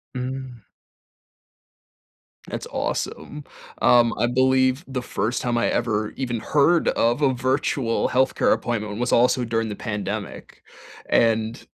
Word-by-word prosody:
Mm. 130 -3 -6 1.8
That's - - -5
awesome. 150 0 -4 0.4
Um, 120 -1 +5
I 120 - +1
believe 130 +3 +2
the 130 -2 -3
first 120 -1 -2
time 120 -1 -1
I 120 - +1
ever 110 -3 -1
even 120 -3 -3
heard 155 +7 +2
of 120 +5 +1
a 135 -2 +3
virtual 130 -1 0
health 130 +1 +1
care - - +2
appointment 105 -2 -3
was 125 - -1
also 125 +1 +3
during 115 -1 -1
the 105 - -5
pandemic. 105 -2 -6 0.5
And, 115 0 +1
120 Hz, 125 wpm, -23 LUFS, 115-130 Hz, 1.8 s, Um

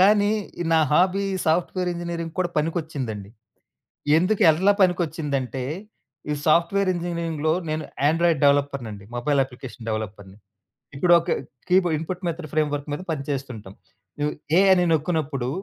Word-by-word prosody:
కానీ 205 +1 +5 0.4
నా 160 - +5
hobby 190 +4 +3 0.2
software 180 +2 +1
ఇంజినీరింగ్‌కి 170 -1 -5
కూడా 180 -1 0
పనికొచ్చిందండి. 145 - -3 0.9
ఎందుకేల్లా 185 -1 +4
పనికొచ్చిందంటే, 150 -7 0 0.7
ఈ 150 - +1
సాఫ్ట్‌వేర్ 175 +5 +3
ఇంజినీరింగ్‌లో 170 -3 -1 0.2
నేను 155 0 -2 0.2
యాండ్రాయిడ్ 165 -1 +2
డవలప్పర్‌నండి, 140 -8 +1
మొబైల్ 140 +3 +2
అప్లికేషన్ 125 -3 -10
డవలప్పర్‌ని. 100 -3 -5 0.6
ఇప్పుడొక 170 +3 +4 0.4
కీబోర్డ్ 180 -3 +3
ఇన్‌పుట్ 180 +3 -5
మెథడ్ 165 -2 -4
ఫ్రేమ్‌వర్క్ 150 -1 0
మీద 150 - -4
పనిచేస్తుంటాం. 135 -9 -5 0.5
నువు 150 0 0 0.3
ఏ - - +6
అని 180 -1 +3
నొక్కినప్పుడు 150 -5 -1
155 Hz, 110 wpm, -24 LUFS, 140-175 Hz, 0.9 s, ఏ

